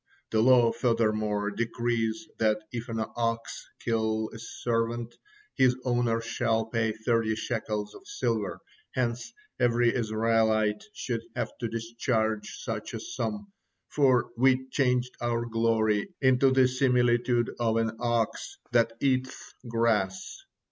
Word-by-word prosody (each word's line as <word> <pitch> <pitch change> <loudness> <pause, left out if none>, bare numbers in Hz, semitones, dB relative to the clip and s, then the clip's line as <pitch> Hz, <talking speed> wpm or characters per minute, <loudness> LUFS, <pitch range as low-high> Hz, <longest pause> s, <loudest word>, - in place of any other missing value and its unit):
The 110 - +3
law 120 -1 +6
furthermore 110 -3 0
decrees 115 +5 -1
that 110 -1 +3
if 120 -1 -5
an 110 -1 -1
ox 115 -1 -2 0.2
kill 110 -1 0
a 115 - -8
servant, 115 0 -2 0.4
his 130 -1 +4
owner 120 -2 +1
shall 115 -1 0
pay 115 -1 0
thirty 110 0 0
shekels 105 -2 -3
of 390 - -14
silver, 410 0 -2 0.3
hence 120 -2 -1 0.3
every 120 0 +3
Israelite 110 -2 +1
should - - -3
have - - -3
to 115 - -2
discharge 115 -1 -1
such - - -4
a - - -4
sum, 210 - -4 0.4
for 130 -4 +3
'we 130 +1 +3
changed 125 -2 +1
our 120 0 0
glory 115 - +1
into 130 0 +4
the 130 -1 +5
similitude 125 -2 +2
of 115 -1 +1
an 115 -1 +1
ox 120 -2 -1
that 115 -1 +3
eateth 130 -1 -1
grass.' 115 -5 0
115 Hz, 125 wpm, -28 LUFS, 110-125 Hz, 0.4 s, law